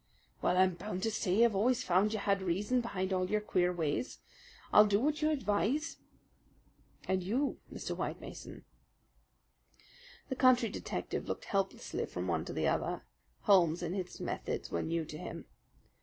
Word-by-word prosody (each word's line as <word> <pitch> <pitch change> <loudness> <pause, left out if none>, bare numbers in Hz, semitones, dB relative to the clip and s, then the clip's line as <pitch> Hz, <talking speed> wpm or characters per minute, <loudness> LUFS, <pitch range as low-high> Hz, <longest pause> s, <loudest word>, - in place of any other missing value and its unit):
"Well, 180 - +2
I'm 185 0 +5
bound 185 +1 -5
to 225 - +1
say 210 +1 +3
I've 235 - +2
always 235 +5 +2
found 185 +4 +3
you 220 - -1
had 200 -1 +1
reason 200 +8 +1
behind 190 -5 -2
all 185 0 0
your 215 - +2
queer 180 -4 +1
ways. 165 - -2 0.6
I'll 210 0 +8
do 205 0 +3
what 300 +5 0
you 305 - +3
advise." 265 +3 0 1.1
"And 190 0 +1
you, 240 +10 -1
Mr. - - -4
White - - -3
Mason?" - - -9 1.6
The 260 - -1
country 250 -3 +5
detective - - -4
looked - - -4
helplessly 195 -1 -2
from 90 +1 -4
one 80 -2 0
to - - -5
the - - 0
other. - - 0 0.4
Holmes 175 -3 +4
and 170 +1 -2
his 185 -2 -4
methods - - -3
were 85 - 0
new 165 0 -1
to 155 0 -8
him. - - -7
195 Hz, 165 wpm, -33 LUFS, 180-230 Hz, 1.6 s, I'll